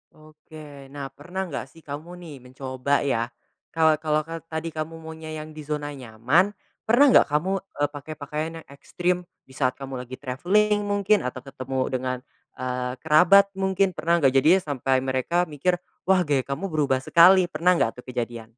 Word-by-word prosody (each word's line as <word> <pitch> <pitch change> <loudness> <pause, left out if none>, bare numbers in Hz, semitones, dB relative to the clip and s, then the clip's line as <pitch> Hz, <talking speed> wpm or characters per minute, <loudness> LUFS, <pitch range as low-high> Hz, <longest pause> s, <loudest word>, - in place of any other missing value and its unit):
Oke. 155 -2 -13
Nah, 140 -1 -7
pernah 180 +6 -5
nggak 145 -5 -5
sih 165 - -18
kamu 155 +5 -7
nih 160 -4 -9
mencoba, 130 +2 -2
ya. 115 -4 0 0.5
Kalau 160 -2 +4
kalau 155 -1 0
ka 165 +1 -7
tadi 160 +1 -4
kamu 160 +1 -5
maunya 160 0 -8
yang 155 - -11
di 155 - -9
zona 145 -1 -3
nyaman, 135 - +1 0.3
pernah 240 +6 +6
nggak - - +6
kamu, 150 +6 0
eee, 145 -7 -3
pakai 145 +1 -8
pakaian 150 +2 -4
yang - - -45
ekstrim 175 +5 -2 0.3
di 130 - -21
saat 130 -1 0
kamu 135 -2 -7
lagi 130 +1 -8
travelling, 195 +12 +1
mungkin 205 +1 +2
atau 125 0 -6
ketemu 130 -1 -5
dengan, 130 0 -2 0.4
eee, 125 0 -3
kerabat 180 +6 +6
mungkin, 190 0 +1
pernah 170 0 +1
nggak? 135 - +6
Jadinya 155 +8 +5
sampai 135 -2 0
mereka 135 +7 0
mikir, 165 +2 0 0.3
"Wah, 185 -1 +4
gaya 145 -4 +1
kamu 140 +8 -3
berubah 140 -4 +1
sekali." 180 +4 +7
Pernah 180 +2 +2
nggak 120 -6 0
tuh - - -10
kejadian? 120 -2 -5
150 Hz, 175 wpm, -24 LUFS, 130-170 Hz, 0.5 s, sekali